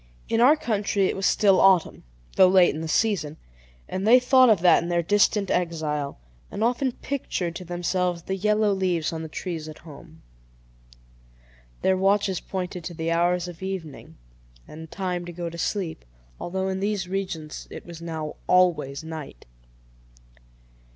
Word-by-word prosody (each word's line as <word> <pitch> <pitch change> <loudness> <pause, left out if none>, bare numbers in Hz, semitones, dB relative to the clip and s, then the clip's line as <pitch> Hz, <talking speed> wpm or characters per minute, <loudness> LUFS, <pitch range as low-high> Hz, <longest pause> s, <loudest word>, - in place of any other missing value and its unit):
In 225 0 +2
our 275 +6 +7
country 210 -8 0
it - - 0
was 195 - 0
still 195 -3 +4
autumn, 190 -4 +3 0.3
though 190 - +7
late 185 -1 +5
in 155 - -5
the 160 - -4
season; 160 -5 0 0.5
and 190 +3 -3
they 245 +3 +8
thought 255 0 +5
of 210 -6 +4
that 175 -1 +5
in 170 - -5
their 170 0 +1
distant 205 +1 +2
exile, 155 -4 -2 0.3
and 215 - -3
often 250 +3 +1
pictured 185 -13 -4
to 185 - -9
themselves 175 0 -1
the 190 - -3
yellow 210 +1 +2
leaves 180 -4 -1
on 160 - -4
the 160 - -7
trees 160 -2 -5
at 155 - -10
home. 160 +1 -14 1.6
Their 190 0 +3
watches 195 -1 +1
pointed 180 -2 -5
to 175 - -6
the 165 0 -2
hours 175 +1 +1
of 175 -1 -10
evening, 185 -7 -7 0.5
and 160 +1 -10
time 180 -1 -3
to 175 - -7
go 170 0 -5
to 170 - -9
sleep, 180 - -3 0.4
although 190 +2 -3
in 190 0 -2
these 200 -2 -2
regions 180 -5 -5
it - - -9
was 170 -1 -10
now 160 -2 -5
always 160 -6 +2
night. 155 - -8
180 Hz, 165 wpm, -25 LUFS, 165-195 Hz, 1.6 s, they